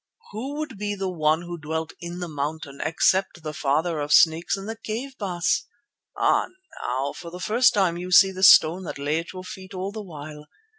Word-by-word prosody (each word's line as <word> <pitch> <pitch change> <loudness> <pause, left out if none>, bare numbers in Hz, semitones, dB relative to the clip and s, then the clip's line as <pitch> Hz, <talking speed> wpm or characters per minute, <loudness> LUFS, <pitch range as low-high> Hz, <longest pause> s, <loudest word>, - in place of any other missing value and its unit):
"Who 260 +7 -5
would 300 -9 -5
be 205 0 -2
the 190 -1 -3
One 155 -1 +1
who 175 0 -7
dwelt 160 +1 -4
in 175 +1 -6
the 175 - -3
mountain 145 -1 -5
except 175 +2 +1
the 155 -1 -5
Father 155 +3 0
of 145 0 -3
Snakes 160 +4 +4
in 195 - -7
the 225 +1 -5
cave, 230 +5 -5
Baas? 180 -3 0 0.5
Ah, - - +2 0.3
now 130 +3 -2
for 170 - -9
the 180 +2 -9
first 235 +7 +3
time 185 -4 +2
you 180 +1 -6
see 190 +1 +7
the 190 0 -7
stone 175 -1 +7
that - - -6
lay 145 +3 0
at 165 - -7
your 185 -1 -8
feet 185 +1 -9
all 190 +2 -3
the 215 +1 -6
while. 150 -4 -10
175 Hz, 205 wpm, -24 LUFS, 155-195 Hz, 0.5 s, see